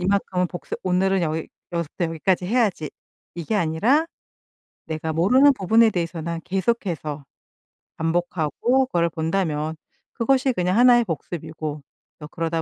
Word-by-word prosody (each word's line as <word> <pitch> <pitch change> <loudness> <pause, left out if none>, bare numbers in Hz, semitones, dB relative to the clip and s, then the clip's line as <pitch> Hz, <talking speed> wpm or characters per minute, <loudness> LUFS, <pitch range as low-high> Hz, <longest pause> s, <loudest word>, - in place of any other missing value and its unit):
이만큼은 185 -1 0
복습 175 - -6
오늘은 190 0 +1
여기 160 0 -2 0.2
여기서부터 170 +1 -2
여기까지 175 +3 0
해야지.' 205 -9 0 0.4
이게 170 +5 -3
아니라 210 - +2 0.8
내가 160 0 -3
모르는 255 - +5
부분에 225 +2 +4
대해서는 170 -2 -3
계속해서 180 - -2 0.7
반복하고 175 - 0
그거를 170 -6 +1
본다면 160 -2 -1 0.4
그것이 260 +2 +2
그냥 180 0 0
1 245 0 +7
의 240 - +2
복습이고 155 -3 -5 0.4
또 150 - -8
그러다 165 +1 -2
175 Hz, 325 characters per minute, -23 LUFS, 160-210 Hz, 0.8 s, 1